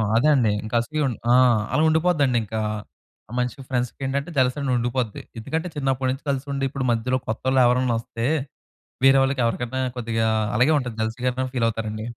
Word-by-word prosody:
అదే 120 Hz, +6 st, +4 dB
అండి. 115 Hz, -5 st, +3 dB
ఇంకా 110 Hz, +2 st, -4 dB
అసూయ 155 Hz, +5 st, -3 dB
ఉండి 120 Hz, -, -4 dB
ఆ! -, -, +6 dB, 0.4 s
అలా 155 Hz, -, +3 dB
ఉండిపోద్దండి 155 Hz, -6 st, +2 dB
ఇంకా. 110 Hz, +1 st, -4 dB, 0.7 s
ఆ -, -, -14 dB
మనిషి 125 Hz, +3 st, -2 dB
ఫ్రెండ్స్ 125 Hz, -1 st, -1 dB
ఏంటంటే 140 Hz, +5 st, -2 dB
జలసీ 130 Hz, +2 st, +2 dB
అని 135 Hz, -2 st, -1 dB
ఉండిపోద్ది. 120 Hz, -2 st, -2 dB, 0.2 s
ఎందుకంటే 160 Hz, +9 st, -3 dB
చిన్నప్పటి 135 Hz, -2 st, 0 dB
నుంచి 135 Hz, -, -6 dB
కలిసి 135 Hz, +1 st, -2 dB
ఉండి, 135 Hz, 0 st, -2 dB
ఇప్పుడు 135 Hz, -1 st, -3 dB
మధ్యలో 125 Hz, +3 st, 0 dB
కొత్తవాళ్ళు 130 Hz, +4 st, +1 dB
ఎవరైనా 125 Hz, -1 st, +2 dB
వస్తే 115 Hz, 0 st, -5 dB, 0.8 s
వేరేవాళ్ళకి 135 Hz, 0 st, +4 dB
ఎవరికన్నా 120 Hz, +2 st, -2 dB, 0.2 s
కొద్దిగా 115 Hz, -1 st, -1 dB, 0.3 s
అలాగే 135 Hz, +7 st, +4 dB
ఉంటది. 125 Hz, -4 st, -4 dB
జలసీగానే 125 Hz, +3 st, -1 dB
ఫీల్ 115 Hz, -2 st, +1 dB
అవుతారండి. 110 Hz, -1 st, -4 dB
125 Hz, 165 wpm, -23 LUFS, 115-135 Hz, 0.8 s, ఆ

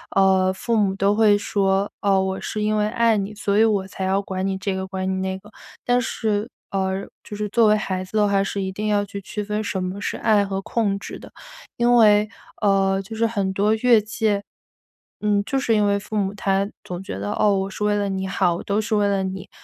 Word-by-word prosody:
呃， 190 Hz, -1 st, +4 dB
父 230 Hz, +5 st, -2 dB
母 205 Hz, -3 st, +2 dB
都 195 Hz, +1 st, +2 dB
会 210 Hz, -2 st, +5 dB
说： 200 Hz, -1 st, 0 dB
“哦， 195 Hz, -1 st, +3 dB
我 190 Hz, 0 st, -2 dB
是 215 Hz, -, -4 dB
因 215 Hz, 0 st, +1 dB
为 210 Hz, -, +2 dB
爱 230 Hz, 0 st, +2 dB
你， 200 Hz, +1 st, -3 dB
所 205 Hz, -1 st, -1 dB
以 220 Hz, -, +6 dB
我 205 Hz, -4 st, +1 dB
才 190 Hz, -, -6 dB
要 190 Hz, +1 st, +1 dB
管 190 Hz, -1 st, -4 dB
你 195 Hz, 0 st, -1 dB
这 190 Hz, 0 st, -2 dB
个、 190 Hz, 0 st, -3 dB
管 190 Hz, 0 st, -3 dB
你 190 Hz, -, 0 dB
那 190 Hz, 0 st, -3 dB
个。” 210 Hz, -, -16 dB, 0.4 s
但 245 Hz, 0 st, +3 dB
是， 215 Hz, -1 st, -2 dB, 0.2 s
呃， 190 Hz, 0 st, -1 dB, 0.2 s
就 210 Hz, -, -8 dB
是 210 Hz, 0 st, -2 dB
作 225 Hz, +1 st, +4 dB
为 210 Hz, 0 st, +4 dB
孩 185 Hz, -3 st, -3 dB
子 185 Hz, +4 st, -5 dB
的 210 Hz, -1 st, +4 dB
话， 200 Hz, -1 st, +2 dB
是 195 Hz, 0 st, -3 dB
一 190 Hz, -, -2 dB
定 210 Hz, +3 st, -4 dB
要 205 Hz, -1 st, +1 dB
去 200 Hz, 0 st, -7 dB
区 210 Hz, +2 st, -5 dB
分 210 Hz, +1 st, -2 dB
什 190 Hz, -2 st, -2 dB
么 185 Hz, +2 st, -4 dB
是 -, -, -3 dB
爱 210 Hz, -2 st, +3 dB
和 195 Hz, 0 st, -3 dB
控 210 Hz, -1 st, -1 dB
制 -, -, -8 dB
的。 -, -, -13 dB, 0.5 s
因 240 Hz, 0 st, +4 dB
为， 210 Hz, -2 st, +5 dB, 0.3 s
呃， 195 Hz, -2 st, +2 dB
就 215 Hz, +3 st, -9 dB
是 230 Hz, +1 st, +1 dB
很 200 Hz, -4 st, -1 dB
多 205 Hz, +3 st, +2 dB
越 230 Hz, 0 st, +4 dB
界 215 Hz, -1 st, -1 dB, 0.8 s
嗯， 205 Hz, -1 st, +2 dB
就 270 Hz, -, -1 dB
是 235 Hz, -4 st, +1 dB
因 210 Hz, -1 st, +3 dB
为 200 Hz, 0 st, +2 dB
父 215 Hz, +1 st, -5 dB
母 195 Hz, -1 st, 0 dB
他 195 Hz, 0 st, 0 dB
总 180 Hz, 0 st, -6 dB
觉 190 Hz, -, -6 dB
得： 100 Hz, +1 st, -3 dB
“哦， 205 Hz, -2 st, +4 dB
我 190 Hz, 0 st, -2 dB
是 205 Hz, -, -5 dB
为 210 Hz, 0 st, +2 dB
了 205 Hz, -1 st, 0 dB
你 190 Hz, 0 st, -2 dB
好， 175 Hz, -2 st, +1 dB
我 -, -, -7 dB
都 205 Hz, +2 st, 0 dB
是 220 Hz, +1 st, -3 dB
为 205 Hz, -1 st, +2 dB
了 200 Hz, -1 st, +1 dB
你， 190 Hz, 0 st, -5 dB
200 Hz, 260 characters per minute, -22 LUFS, 190-215 Hz, 0.8 s, 以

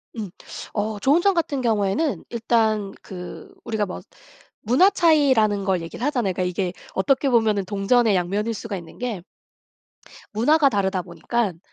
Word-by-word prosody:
음. 215 Hz, -4 st, -5 dB, 0.4 s
어 210 Hz, 0 st, -2 dB
좋은 290 Hz, +8 st, +3 dB
점 395 Hz, 0 st, +3 dB
같은 290 Hz, -6 st, -1 dB
경우에는 225 Hz, +6 st, 0 dB
일단 220 Hz, -3 st, 0 dB
그 190 Hz, -, -9 dB
우리가 220 Hz, -2 st, -1 dB
뭐 -, -, -7 dB, 0.6 s
문화 260 Hz, -, +5 dB
차이라는 260 Hz, -, +3 dB
걸 185 Hz, -3 st, +1 dB
얘기를 165 Hz, +10 st, -6 dB
하잖아요. 245 Hz, -10 st, 0 dB
그러니까 185 Hz, -, -2 dB
이게 180 Hz, 0 st, -2 dB, 0.2 s
어떻게 265 Hz, +8 st, +1 dB
보면은 220 Hz, -5 st, +2 dB
동전의 210 Hz, +2 st, +2 dB
양면일 200 Hz, +6 st, -1 dB
수가 210 Hz, -2 st, -5 dB
있는 170 Hz, -2 st, -11 dB
게 225 Hz, -8 st, -4 dB, 1.1 s
문화가 285 Hz, +7 st, +4 dB
다르다 190 Hz, -4 st, 0 dB
보니깐 185 Hz, +1 st, -2 dB
215 Hz, 325 characters per minute, -23 LUFS, 195-255 Hz, 1.1 s, 문화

